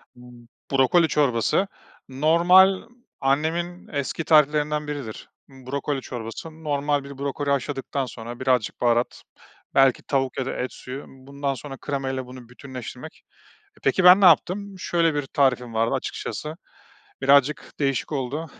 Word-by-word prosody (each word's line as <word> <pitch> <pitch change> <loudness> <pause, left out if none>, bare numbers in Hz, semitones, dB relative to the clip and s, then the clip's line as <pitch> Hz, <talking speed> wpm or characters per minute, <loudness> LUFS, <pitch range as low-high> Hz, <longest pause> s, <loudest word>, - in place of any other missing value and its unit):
B 125 -1 -15 0.2
brokoli 140 +5 +4
çorbası, 145 - +1 0.4
normal 175 +7 +5 0.4
annemin 160 +6 -1
eski 145 +3 -3
tariflerinden 150 -1 +3
biridir, 140 -7 -6 0.2
brokoli 135 +1 -4
çorbası. 120 +6 -7
Normal 145 -1 0
bir 140 -1 -10
brokoli 140 +1 -3
haşladıktan 140 0 -1
sonra 120 -1 -8
birazcık 125 -5 0
baharat, 120 0 +1 0.5
belki 135 -2 +4
tavuk 135 -2 -1
ya 130 - -1
da - - -3
et 125 - -3
suyu, 130 +2 -8
bundan 140 +1 -5
sonra 135 +2 -8
krema 135 -1 -3
ile 130 -1 -3
bunu 125 -2 -12
bütünleştirmek. 125 +3 -9 0.5
E, - - -22
peki, 190 - +2
ben 180 +2 +9
ne - - +4
yaptım? 190 +4 +3
Şöyle 170 -3 +1
bir 145 -2 -2
tarifim 125 -5 +1
vardı 115 +1 +1
açıkçası, 155 +1 -4 0.7
birazcık 140 +1 +3
değişik 135 +1 -1
oldu. 140 +4 -3
140 Hz, 135 wpm, -24 LUFS, 130-150 Hz, 0.7 s, ben